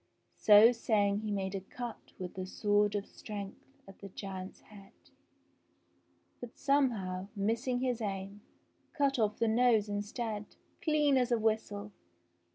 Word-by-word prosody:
i - - -44
So 215 +2 +8
saying 205 -4 +1
he 215 0 -4
made 195 -1 -2
a 195 - -3
cut 240 +5 -8
with 180 -1 -6
the 185 0 -5
sword 205 +1 +1
of 205 -1 -2
strength 200 -2 -8 0.3
at, 195 - -14
the 200 - -9
giant's 190 -1 -7
head, 200 -2 -15 1.5
but, 245 -1 -9
somehow, 225 -10 +1
missing 230 +5 0
his 250 -2 -1
aim, 200 0 -4 0.6
cut 275 -3 +2
off 210 -1 +1
the 230 - +1
I - - +2
nose 225 -2 +3
instead, 210 +1 -4 0.3
clean 300 -3 +3
as 250 -1 +1
a 240 - +4
whistle 215 -2 -1
210 Hz, 150 wpm, -32 LUFS, 200-240 Hz, 1.5 s, So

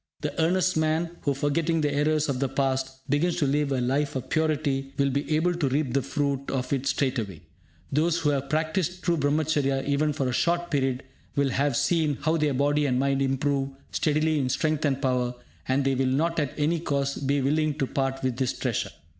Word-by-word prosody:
The 150 -1 -2
earnest 185 +1 +2
man 160 +2 0
who, 140 -2 +1
forgetting 155 +4 0
the 145 -1 0
errors 150 +1 +2
of 135 -3 -1
the 135 -1 0
past, 135 0 -2
begins 150 +5 +1
to 155 - +1
live 140 +1 +1
a 135 - +1
life 135 +4 0
of 130 0 -5
purity 145 -4 0
will 140 -1 +2
be 140 +3 0
able 175 +3 +2
to 165 -6 0
reap 135 -2 0
the 140 - +2
fruit 140 0 -2
of 130 0 -2
it 135 0 -1
straightway. 125 - -1 0.5
Those 160 +4 +2
who 150 - +1
have 140 -1 -2
practised 160 +4 -1
true 175 -1 +2
Brahmacharya 145 -2 +1
even 145 +2 +1
for 140 -3 -1
a 125 - -1
short 175 +5 0
period 135 -3 0 0.3
will 140 -1 +2
have 140 -1 +1
seen 155 -5 +1
how 160 +1 +1
their 150 -3 +1
body 145 +2 +2
and 125 -2 +1
mind 135 +1 +1
improve 135 0 0 0.2
steadily 155 0 +1
in 130 -2 0
strength 155 +3 0
and 135 -2 +1
power, 125 -2 0 0.3
and 135 +1 +1
they 135 - +2
will 130 0 +1
not, 165 +6 +1
at 145 -3 -2
any 160 +3 +1
cost, 140 -3 -2
be 140 +1 +2
willing 150 +2 +1
to 135 - +1
part 135 0 -2
with 130 -2 -1
this 130 -2 0
treasure. - - -2
140 Hz, 205 wpm, -26 LUFS, 135-155 Hz, 0.5 s, earnest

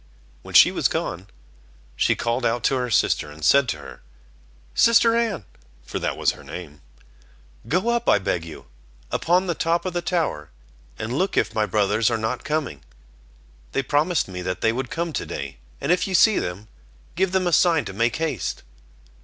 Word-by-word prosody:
When - - -10
she - - +8
was - - 0
alone, 90 +3 -3 0.7
she - - +2
called 120 +2 -1
out 115 0 0
to 135 - +2
her 125 -1 -1
sister, 85 -8 +1
and 75 +1 -7
said 140 -3 +5
to - - -2
her: 65 -4 -12 0.7
"Sister 230 0 +5
Anne" 220 - -1 0.4
(for - - -4
that - - -2
was - - +2
her - - -13
name), 75 0 -9 0.9
"go 185 - 0
up 235 0 +1
I - - +6
beg 90 -3 -2
you, 80 -1 -10 0.5
upon 180 +3 +2
the 175 - 0
top 165 +2 0
of 185 - -3
the 175 - -1
tower, 160 - -2 0.5
and 110 +2 -4
look 185 +8 -1
if - - +1
my 110 -1 0
brothers 105 +2 +2
are 115 - 0
not 110 0 -3
coming; 145 - -3 0.9
they 135 - 0
promised 150 +6 +1
me 90 -1 -6
that 90 0 -4
they 110 - +2
would 125 0 -3
come 165 +1 -3
to - - -2
day, 70 -2 -6 0.2
and - - -1
if 180 - +2
you 190 - -1
see 215 +5 +5
them, 95 +5 -5 0.5
give 185 +2 0
them 190 -1 +1
a 175 - 0
sign 165 -2 +4
to 95 - -6
make 115 +4 +1
haste." 155 - -3
125 Hz, 190 wpm, -23 LUFS, -, 0.9 s, she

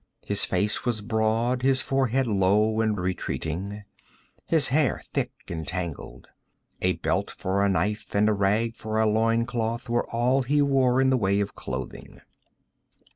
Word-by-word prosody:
His - - +1
face 105 0 0
was 120 -4 -1
broad, 110 +3 0
his 130 0 +3
forehead 135 -1 +1
low 105 +1 +2
and 110 -2 0
retreating, 95 +2 -3 0.6
his 160 -3 +4
hair 145 +1 +1
thick 125 -3 -1 0.2
and 80 -4 -5
tangled. 80 -7 -5 0.5
A - - +2
belt - - -1
for 95 +2 -1
a 100 - +3
knife 100 +4 -1
and 105 +1 +4
a 110 - +3
rag 105 +3 +1
for 110 0 -3
a 110 - +3
loin 115 +2 +2
cloth 120 0 -3
were 120 0 0
all 125 +3 +1
he 145 +4 +1
wore 135 -3 +3
in 135 0 +3
the 130 - +3
way 100 -3 +1
of 100 -1 -2
clothing. 65 -1 -7
110 Hz, 160 wpm, -26 LUFS, 100-125 Hz, 0.6 s, his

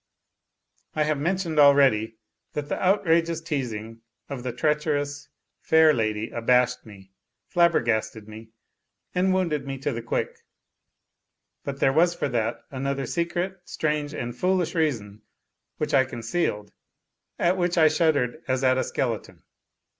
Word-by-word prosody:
I 155 - +2
have 150 -1 0
mentioned 170 0 -1
already 135 -6 +5 0.4
that 145 -1 -4
the - - -2
outrageous 170 -4 +2
teasing 115 -8 -4 0.3
of 140 -3 -5
the 125 0 -3
treacherous 145 +1 -1 0.3
fair 160 -1 +5
lady 110 -2 -1
abashed 125 +1 +1
me, 95 -2 -14 0.4
flabbergasted 115 -11 +1
me, 110 +1 -11 0.6
and 185 +1 +2
wounded 170 -7 0
me 135 0 -4
to 145 +2 -2
the 115 -2 -4
quick. - - -3 1.2
But 140 -1 -6
there 135 - +4
was 170 +3 +3
for - - -2
that 115 -1 -2
another 135 0 -2
secret, 175 +5 -2
strange 150 -1 -2
and 120 -3 -4
foolish 185 -2 0
reason, 115 - -1 0.6
which 150 - -2
I 135 -1 +5
concealed, 115 -3 -3 0.7
at 175 +2 +2
which 175 -1 0
I 160 -1 +7
shuddered 155 -3 +1
as 130 0 0
at 130 0 +3
a - - +1
skeleton. 115 -5 -3
140 Hz, 135 wpm, -25 LUFS, 120-165 Hz, 1.2 s, I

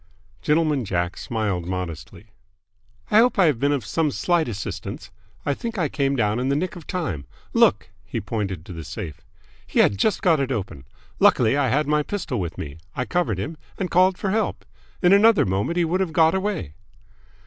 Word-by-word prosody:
Gentleman 150 -3 +2
Jack 90 -3 -1
smiled 100 -7 -2
modestly. 90 0 -5 0.9
"I 210 - +7
hope 245 +1 +4
I 190 - +5
have 145 -8 +2
been 140 +2 +2
of 140 -7 -1
some 160 +6 0
slight 170 +2 +1
assistance! 105 -4 -6 0.3
I 145 - +1
think 230 +9 -5
I 165 -6 +1
came 140 -1 0
down 105 -2 +1
in 130 +2 0
the 140 - +2
nick 180 +5 -2
of 170 -4 -11
time. 120 - -3 0.3
Look!" - - +3
He - - -4
pointed 95 -7 -4
to 95 - -8
the 80 -1 -7
safe. 80 -1 -7 0.5
"He - - -5
had 100 - +4
just 215 - +1
got 165 -5 +4
it 135 -1 -1
open! 95 - -4 0.3
Luckily 110 - +4
I 140 -2 +2
had 145 +5 +2
my 150 +1 +2
pistol 150 - -3
with 85 -2 -4
me. 75 +1 -7 0.2
I 125 - -1
covered 175 - 0
him, 130 - -4 0.2
and 185 -2 -3
called 185 +1 +4
for 195 - -2
help. 220 0 -1 0.4
In 180 +2 +6
another 215 +2 +6
moment 100 - -1
he 175 - +3
would 175 +3 0
have 185 -4 -1
got 160 0 +4
away." 190 - -2
140 Hz, 195 wpm, -23 LUFS, -, 0.9 s, I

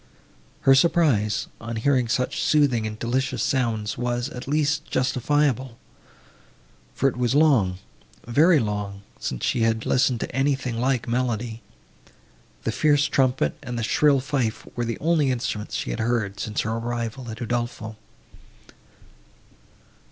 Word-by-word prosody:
Her 135 - +6
surprise, 135 - +3 0.2
on 115 0 -5
hearing 125 +1 +2
such 120 +3 -1
soothing 135 -7 +2
and 110 0 -6
delicious 125 +4 -1
sounds, 115 -5 -1
was, 120 +1 -1
at 125 -4 -8
least, 150 +1 +1
justifiable; 130 -1 0 1.2
for 135 - +2
it 130 - -1
was 125 +1 +1
long—very 140 - +2
long, 105 -4 -3 0.2
since - - -3
she 120 - +1
had 115 0 +1
listened 125 -2 +2
to - - -5
anything 135 -3 0
like 130 -1 0
melody. 120 -2 -2 1.0
The - - 0
fierce 145 -2 +3
trumpet 130 - +1
and 120 0 -5
the 115 - -2
shrill 140 +4 +3
fife 130 -5 -2
were 120 - -1
the 115 - -3
only 160 -3 +2
instruments 115 -4 -3
she - - -2
had - - -4
heard, 110 -4 -1
since 105 +1 -2
her 110 - -2
arrival 115 +1 -3
at 110 - -7
Udolpho. 120 -2 -3
120 Hz, 135 wpm, -24 LUFS, 110-135 Hz, 1.2 s, Her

